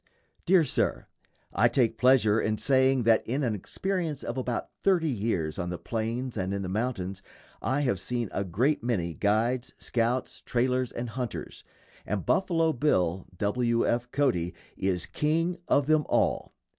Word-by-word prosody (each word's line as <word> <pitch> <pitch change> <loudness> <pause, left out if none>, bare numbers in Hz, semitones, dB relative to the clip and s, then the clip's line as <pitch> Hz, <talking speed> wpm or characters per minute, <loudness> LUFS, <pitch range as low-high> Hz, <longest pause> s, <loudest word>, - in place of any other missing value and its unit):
_ - - -43
DEAR 180 -1 +6
SIR: 140 - 0 0.5
I 120 - +4
take 120 -2 +1
pleasure 120 -4 +4
in 110 0 0
saying 130 0 +3
that 115 0 +4
in 135 +5 -1
an 120 -4 +1
experience 165 - -3
of - - -4
about 125 -2 -3
thirty 175 -6 +2
years 100 -9 -1
on 90 -1 -2
the 90 - -3
plains 115 +7 -3
and 95 0 -1
in 100 - -3
the - - -3
mountains 95 -3 -2 0.4
I 135 +3 0
have 125 -10 0
seen 120 +4 -2
a 100 - -1
great 120 - +1
many 95 -9 -1
guides, 115 +7 0
scouts, 120 +2 -1
trailers, 125 0 0
and 120 0 -4
hunters, 125 -1 -5 0.4
and 100 -2 -3
Buffalo 165 -4 +2
Bill 95 - +1
(W. 115 +4 +1
F. 120 +1 0
Cody) 115 - 0 0.2
is 95 -2 -1
"king 165 +4 0
of 140 - +3
them 155 0 +2
all." - - +1
120 Hz, 160 wpm, -28 LUFS, 105-135 Hz, 0.5 s, DEAR